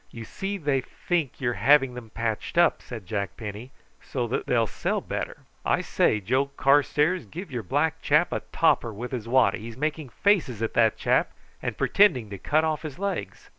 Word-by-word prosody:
"You 115 -1 -9
see 195 - -4
they 145 -6 0
think 160 +1 -3
you're 120 -3 0
having 135 +4 +4
'em 120 -2 -9
patched 115 +6 -3
up," 175 -1 +4
said 115 -6 -8
Jack 100 -1 -3
Penny, 105 +2 -7 0.3
"so 120 -2 -3
as - - 0
they'll 115 -2 +3
sell - - -2
better. - - -5 0.2
I - - +1
say, 105 - +2
Joe 130 +8 +1
Carstairs, 145 - +2
give 170 - -8
your 120 -2 -3
black 150 - 0
fellow 150 +4 +4
a - - -1
topper 125 -7 +2
with 115 +4 -6
his 120 -4 -4
waddy; 120 -5 +3
he's 115 +2 -9
making 155 0 -2
faces 135 - +1
at 115 - -2
that 115 -2 +3
chap, - - +1 0.3
and - - -3
pretending 130 - +3
to 100 - -6
cut 155 - +2
off 155 -2 -1
his 155 -3 -7
legs." 200 -2 -4
130 Hz, 190 wpm, -26 LUFS, 115-155 Hz, 0.3 s, having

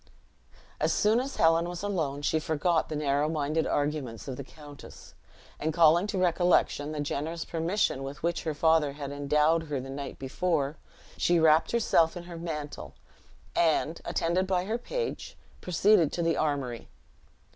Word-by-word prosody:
As - - +1
soon 215 +3 +3
as 270 +2 -4
Helen 165 +1 +3
was 175 +1 -6
alone, 155 -8 -2
she 160 - +1
forgot 160 +2 0
the 155 - -3
narrow 145 0 +1
minded 155 0 -1
arguments 145 -6 -2
of 130 - -4
the 140 - -6
countess; 145 +1 -13 0.5
and 160 - -1
calling 170 +3 +4
to 205 - -3
recollection 175 -4 +2
the 155 - -4
generous 150 +3 -3
permission 165 -3 -1
with 140 +3 -7
which 170 0 0
her 155 -2 -3
father 160 -2 +3
had 140 -1 -6
endowed 150 +3 +2
her 145 -2 -2
the 135 +1 -7
night 140 0 -6
before, 145 +1 -1 0.4
she 175 -1 +3
wrapped 160 0 +4
herself 180 -8 +2
in 175 - -7
her 175 -1 -9
mantle, 150 - -6 0.6
and, 165 0 +1
attended 180 +3 0
by 185 -1 0
her 225 +4 -2
page, 470 - -4 0.2
proceeded 180 -1 +3
to 170 - -1
the 165 0 +1
armory. 140 -6 -2
160 Hz, 160 wpm, -28 LUFS, 145-175 Hz, 0.6 s, calling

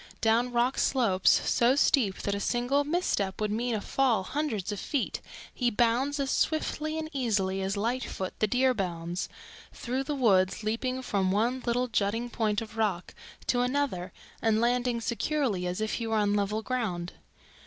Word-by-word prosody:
Down 230 +2 +2
rock 245 +2 +1
slopes, 200 -8 +3 0.2
so 240 +3 +4
steep 245 -8 +2
that 200 - 0
a 200 - -2
single 245 +6 +1
misstep 285 - -1
would 210 -1 0
mean 235 +2 0
a 210 - -2
fall 245 -7 +1
hundreds 225 -6 -2
of 205 - -4
feet, 280 -4 -2 0.3
he 245 -2 +1
bounds 240 +6 +1
as 275 -1 0
swiftly 310 0 0
and 315 0 -3
easily 200 -8 0
as 195 +1 -2
Lightfoot 225 -3 -2
the 215 - +3
Deer 255 +3 +3
bounds 175 -3 -3 0.4
through 260 +2 -3
the 295 - -2
woods, 195 -6 +3
leaping 255 +4 -2
from 195 -5 0
one 235 +6 +1
little 245 +1 +1
jutting 225 +2 -1
point 215 -2 0
of 225 0 -12
rock 200 -5 -1 0.3
to 245 - +2
another 250 -9 -1 0.3
and 220 -1 +2
landing 245 0 +1
securely 235 -6 -1
as 180 +2 -3
if 215 0 -1
he 230 - -2
were 225 0 +1
on 205 -1 +2
level 210 +2 0
ground. 190 -9 -2
230 Hz, 170 wpm, -29 LUFS, 200-255 Hz, 0.4 s, so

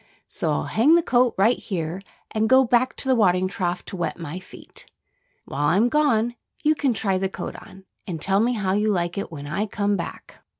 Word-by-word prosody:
So - - -2
I'll - - 0
hang 280 +9 +4
the 340 - +3
coat 250 -3 +2
right 220 +6 +3
here 175 -2 -4 0.3
and 220 0 0
go 260 0 +6
back 250 +2 +2
to - - -2
the 260 - +4
watering 185 -5 +3
trough 180 -1 -3
to - - -7
wet 175 - -3
my 165 +1 -6
feet. 185 - -11 0.6
While 145 +2 -1
I'm 200 +10 +3
gone 240 -5 +2 0.3
you 305 - +4
can 275 -5 0
try 195 -2 0
the 190 0 -1
coat - - -6
on, 190 0 -13 0.2
and 170 -4 -4
tell 195 +4 +2
me 240 +3 +2
how 195 -5 -1
you 210 +2 +1
like 175 -1 -1
it 200 - -5
when 145 -3 -7
I 195 +9 -2
come 205 0 0
back." 170 - -8
200 Hz, 215 wpm, -23 LUFS, 180-240 Hz, 0.6 s, go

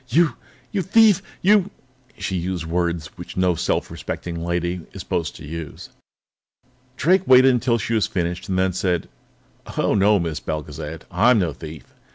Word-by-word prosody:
"You 160 +5 +3 0.4
you 195 - 0
thief! 210 +2 +5 0.2
You 200 0 +4 0.2
" 130 -1 -33
She 95 - -3
used 90 -1 -2
words 85 -1 -2
which 90 +1 -9
no 90 -1 +3
self 80 - -1
respecting 85 -1 -5
lady 85 +1 -1
is - - -7
supposed 85 -3 -2
to - - -10
use. 80 -1 -7 1.1
Drake 185 +4 +3
waited 130 +1 +7
until 120 -1 +2
she 115 +1 -3
had 110 -2 +3
finished, 90 +1 -3
and 95 - 0
then 95 0 +2
said: 90 -2 -1 0.7
"Oh, - - +2
no, 105 +1 +4
Miss 80 -3 -2
Belgezad; 75 +1 -5
I'm 115 +7 +4
no 85 -7 0
thief. 75 +1 -10
90 Hz, 165 wpm, -22 LUFS, 85-125 Hz, 1.1 s, waited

